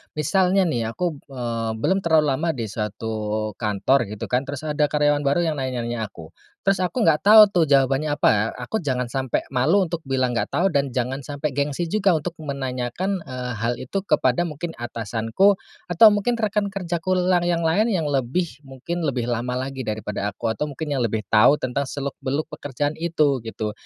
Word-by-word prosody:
Misalnya, 185 +5 +2
nih, 120 -10 -1
aku, 170 -6 -2
eee, 115 -4 -3
belum 165 +13 +1
terlalu 160 -4 +3
lama 160 +5 0
di 110 -4 -4
suatu 110 0 -3
kantor, 110 +3 +1
gitu, 105 +3 -7
kan. 125 +2 +1
Terus, 140 +1 -5
ada 150 -1 +1
karyawan 145 0 +2
baru 170 +5 +2
yang 155 -4 -1
nanya-nanya 120 -4 -3
aku. 80 -5 -13 0.3
Terus, 195 -1 +2
aku 200 +6 -1
enggak 155 -2 +4
tahu, 215 +1 +9
tuh, 175 -2 +3
jawabannya 140 +2 +2
apa. 110 -6 +2 0.2
Aku 220 - -1
jangan 125 -4 -1
sampai 130 -1 -1
malu 150 +10 +3
untuk 170 0 -3
bilang 130 -2 +1
enggak - - -1
tahu, 175 +7 +2
dan 140 -2 +1
jangan 130 +2 -2
sampai 145 +1 -3
gengsi 145 +4 -1
juga 195 -1 +2
untuk 160 +2 -2
menanyakan, 140 +6 -3
eee, 125 -1 -5
hal 115 +1 0
itu 165 +10 -4
kepada 130 +6 +2
mungkin, 160 +2 -5
atasanku 115 - +1 0.3
atau 175 +6 +7
mungkin 235 +4 0
rekan 210 -2 0
kerjaku 185 -1 -2
lang 180 -1 +2
yang 170 -1 0
lain, 200 +8 +2
yang 180 -7 0
lebih, 145 +3 -1
mungkin 140 +5 -6
lebih 130 -6 -1
lama 125 +2 -2
lagi 130 0 -4
daripada 105 -3 -3
aku, 110 +3 -3
atau 150 - -2
mungkin 145 +2 -5
yang 135 - 0
lebih 110 -2 -1
tahu 110 +6 +6
tentang 130 +2 -2
seluk-beluk 140 +1 -3
pekerjaan 145 +1 -3
itu, 155 -5 +1
gitu. 110 -1 -3
140 Hz, 180 wpm, -23 LUFS, 120-170 Hz, 0.3 s, tahu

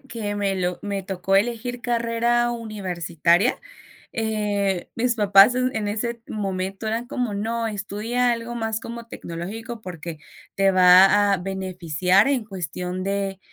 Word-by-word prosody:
que 225 -6 -5
me 200 -1 0
lo 180 -1 -2
me 200 -1 -3
tocó 195 0 0
elegir 240 +3 -1
carrera 235 +1 +1
universitaria, 185 - 0 0.6
eh, 205 -4 -1
mis 240 +1 +1
papás 205 +2 +6
en 250 -4 -1
ese 230 +3 -3
momento 195 0 -3
eran 225 +2 -2
como 245 -5 -2
no 230 +3 -2
estudia 220 +4 -1
algo 235 0 -4
más 225 -2 -2
como 235 0 -8
tecnológico 220 +5 -7
porque 170 -3 -7 0.4
te 195 0 +3
va 190 +2 +6
a - - 0
beneficiar 185 0 +1
en 260 -6 0
cuestión 180 -1 -5
de, 195 -1 -2
205 Hz, 135 wpm, -23 LUFS, 190-230 Hz, 0.6 s, papás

